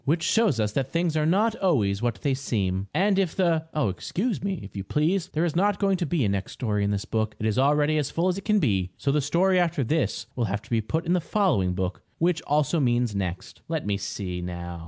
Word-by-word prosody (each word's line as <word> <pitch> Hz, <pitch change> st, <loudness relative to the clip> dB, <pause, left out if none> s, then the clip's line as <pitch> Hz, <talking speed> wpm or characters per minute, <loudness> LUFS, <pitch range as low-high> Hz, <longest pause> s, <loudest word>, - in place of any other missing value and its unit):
Which 160 Hz, +4 st, +1 dB
shows 195 Hz, -, +2 dB
us 105 Hz, -1 st, +1 dB
that 135 Hz, +4 st, -2 dB
things 170 Hz, -1 st, 0 dB
are 155 Hz, 0 st, +2 dB
not 210 Hz, +6 st, +2 dB
always 110 Hz, -, +1 dB
what 120 Hz, -2 st, 0 dB
they 140 Hz, -, +2 dB
seem. 100 Hz, -8 st, -1 dB
And 195 Hz, +1 st, +2 dB
if 185 Hz, -4 st, 0 dB
the 165 Hz, -4 st, +2 dB
Oh, 150 Hz, -5 st, 0 dB
excuse 200 Hz, -, -2 dB
me, 195 Hz, -4 st, -2 dB
if 100 Hz, -, -11 dB
you 100 Hz, -, -3 dB
please. 165 Hz, -, 0 dB
There 160 Hz, -1 st, -1 dB
is 170 Hz, -, -2 dB
not 200 Hz, +3 st, +2 dB
going 195 Hz, -2 st, +2 dB
to 175 Hz, -3 st, -2 dB
be 150 Hz, -6 st, +1 dB
a -, -, +1 dB
next 100 Hz, 0 st, -2 dB
story 105 Hz, -4 st, -1 dB
in 100 Hz, -, +1 dB
this 100 Hz, 0 st, -1 dB
book. 110 Hz, -1 st, -1 dB
It 110 Hz, -, -4 dB
is 110 Hz, +3 st, +1 dB
already 150 Hz, +2 st, +3 dB
as 145 Hz, -2 st, -1 dB
full 170 Hz, +4 st, 0 dB
as 185 Hz, -, +1 dB
it -, -, -12 dB
can 210 Hz, +1 st, +2 dB
be, 100 Hz, -, +1 dB
so 140 Hz, -, 0 dB
the 150 Hz, +1 st, +2 dB
story 180 Hz, +6 st, +2 dB
after 165 Hz, -5 st, +1 dB
this 125 Hz, -3 st, -1 dB
will 120 Hz, -, 0 dB
have 100 Hz, +1 st, -3 dB
to -, -, -18 dB
be 115 Hz, -1 st, +2 dB
put 160 Hz, +10 st, -2 dB
in 170 Hz, -, +1 dB
the 180 Hz, -, +2 dB
following 160 Hz, -, +1 dB
book, 95 Hz, 0 st, -3 dB, 0.2 s
which 170 Hz, -1 st, +1 dB
also 150 Hz, +3 st, +2 dB
means 120 Hz, -4 st, +1 dB
next. 95 Hz, -3 st, -4 dB
Let 160 Hz, -2 st, -2 dB
me 100 Hz, -1 st, 0 dB
see, 95 Hz, -2 st, -4 dB
now. 85 Hz, -1 st, -6 dB
145 Hz, 255 wpm, -26 LUFS, 105-175 Hz, 0.2 s, already